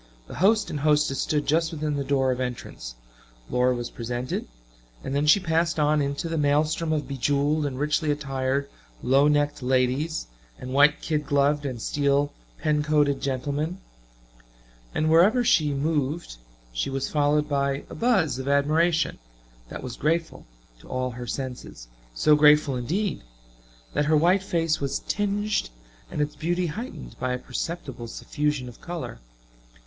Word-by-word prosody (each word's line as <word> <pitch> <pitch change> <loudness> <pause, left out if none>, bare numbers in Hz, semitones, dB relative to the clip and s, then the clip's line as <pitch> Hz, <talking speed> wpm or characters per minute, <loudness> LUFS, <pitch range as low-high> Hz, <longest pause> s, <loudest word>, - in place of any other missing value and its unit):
The - - -11
host 210 +2 +3
and 150 - -3
hostess 150 -2 +2
stood 150 -1 0
just 160 +2 +2
within 155 -2 -2
the 140 - -1
door 135 -1 +1
of 125 - -2
entrance; 120 - -5 0.6
Laura 125 0 +2
was 120 0 -5
presented, 120 +2 -4 0.6
and 135 - -4
then 145 +2 +1
she 155 - +7
passed 165 -2 0
on 150 0 +3
into 140 +3 -2
the 165 -1 -2
maelstrom 150 +3 +1
of 155 -2 -1
be 140 - -5
jeweled 145 +3 +1
and 130 -2 -5
richly 150 +1 0
attired 135 -1 -1 0.4
low 135 +3 +4
necked 145 -1 +1
ladies 130 +5 0 0.3
and 130 0 -7
white 145 +2 +5
kid 150 -3 -1
gloved 145 +1 +2
and 125 -3 -5
steel 140 +3 +1 0.2
pen 150 -1 +1
coated 150 -2 +2
gentlemen 145 +6 -2 1.2
and 155 - +1
wherever 185 +10 +5
she 155 -11 +3
moved 145 - -1 0.4
she - - -1
was 135 0 -2
followed 150 0 +2
by 140 -1 0
a - - -10
buzz 190 - +1
of 130 - -5
admiration 155 +4 +2 0.5
that - - -7
was 125 -2 -5
grateful 165 - -1 0.3
to - - -16
all 130 0 -2
her 120 0 -7
senses 125 - -6 0.3
so 150 - +5
grateful, 150 -2 +5
indeed, 165 - -2 0.7
that 145 - +1
her 155 +1 +4
white 180 +5 +4
face 165 -5 0
was 140 -1 -1
tinged 205 - 0 0.4
and 150 - -2
its 150 0 -2
beauty 175 +3 -1
heightened 220 - -6
by 130 -1 -1
a - - -1
perceptible 130 -1 -5
suffusion 145 +2 -2
of 120 - -12
color. 170 - -6
145 Hz, 155 wpm, -25 LUFS, 135-160 Hz, 1.2 s, she